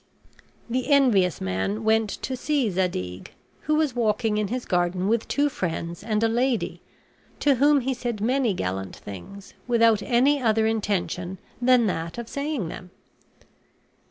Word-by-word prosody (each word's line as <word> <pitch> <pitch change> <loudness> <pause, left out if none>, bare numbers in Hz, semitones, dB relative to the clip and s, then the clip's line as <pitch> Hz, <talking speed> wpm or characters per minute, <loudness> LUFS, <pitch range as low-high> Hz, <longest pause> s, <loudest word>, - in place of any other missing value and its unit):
The 250 +3 -2
envious 235 - +4
man 95 - -2
went 220 0 +2
to 260 - -2
see 265 -3 0
Zadig, 95 - -3 0.3
who 305 - 0
was 305 -5 +1
walking 215 -2 +1
in 210 - 0
his 245 +4 -3
garden 180 +1 0
with 230 +1 +1
two 290 +1 +2
friends 170 - -4
and 215 0 0
a - - +5
lady, 240 +1 0 0.6
to 285 - +4
whom 285 +2 +4
he 265 +2 -1
said 240 -3 -4
many 240 -1 +1
gallant 95 - -3
things, 190 - -10
without 230 -3 +4
any 265 +5 +3
other 220 -2 +2
intention 190 -4 -1 0.2
than 245 -1 +5
that 165 -3 -3
of 235 -1 -5
saying 280 - -3
them. 180 +2 -8
220 Hz, 150 wpm, -25 LUFS, 185-255 Hz, 0.6 s, a